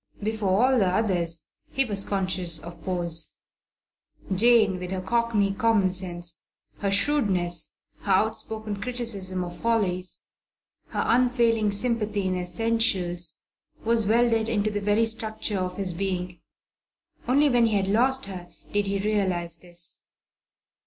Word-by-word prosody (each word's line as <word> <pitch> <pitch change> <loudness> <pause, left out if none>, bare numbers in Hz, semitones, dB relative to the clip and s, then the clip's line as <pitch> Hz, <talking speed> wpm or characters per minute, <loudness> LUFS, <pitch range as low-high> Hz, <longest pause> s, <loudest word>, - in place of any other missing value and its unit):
Before 215 0 +1
all 260 -1 +3
the 195 - +3
others 180 -5 0 0.3
he 270 - +1
was 200 -4 -2
conscious 185 -4 +1
of 170 +1 -9
pose. 170 -3 -1 1.0
Jane, 215 -2 +4
with 180 0 -5
her 190 0 -2
cockney 215 0 +1
common 205 -3 +2
sense, 175 -2 -4 0.4
her 200 - 0
shrewdness, 195 - +1 0.3
her 200 - -3
outspoken 215 0 -1
criticism 205 -7 -1
of 175 -1 -8
follies, 190 -6 0 0.6
her - - -2
unfailing 235 -3 +2
sympathy 210 -2 -1
in 185 0 0
essentials, 180 -3 -1 0.4
was 225 -2 +2
welded 225 0 +2
into 215 -1 0
the 205 0 -2
very 210 +3 +2
structure 220 -2 -2
of 180 0 -3
his 190 -3 -2
being. 180 -1 -3 0.9
Only 280 +4 +4
when 245 -4 +4
he 220 - 0
had 195 -1 +1
lost 255 +6 +2
her 180 -3 -8 0.2
did 205 -1 0
he 200 0 0
realize 190 -5 -1
this. 175 0 +1
200 Hz, 130 wpm, -25 LUFS, 180-225 Hz, 1.0 s, Jane